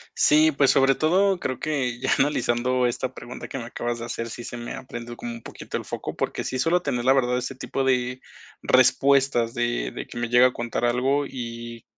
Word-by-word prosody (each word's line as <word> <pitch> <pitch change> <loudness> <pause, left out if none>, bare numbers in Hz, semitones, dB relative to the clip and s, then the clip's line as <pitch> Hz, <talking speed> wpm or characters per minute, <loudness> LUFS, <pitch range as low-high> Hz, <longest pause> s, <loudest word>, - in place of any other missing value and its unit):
Sí, 155 +1 +5
pues 140 -2 +3
sobre 135 0 +5
todo 185 +5 +2
creo 130 -5 -3
que 130 -6 -2
ya - - -1
analizando 125 -2 +1
esta 125 +1 -2
pregunta 120 - -8
que - - -6
me 125 - -5
acabas 120 0 -3
de 115 - -6
hacer, 115 -1 -4
sí 120 +1 -7
se 120 - -6
me, 120 0 -6
ah, - - -8
prende 120 0 -7
como 120 0 -6
un 115 - -9
poquito - - -8
el - - -3
foco, - - -5
porque - - -2
sí 130 - -3
suelo 175 +5 +2
tener 120 -7 -1
la 130 +2 +5
verdad 125 -2 +2
ese 125 +2 -5
tipo 135 +1 -3
de 125 -1 0 0.4
respuestas 130 -2 +3
de 120 0 -1
de - - -6
que 120 - -8
me 120 -1 -2
llega 125 +1 +6
a 125 - -4
contar 120 0 -2
algo 130 +4 +1
y 115 -2 -7
125 Hz, 220 wpm, -24 LUFS, 120-135 Hz, 0.4 s, llega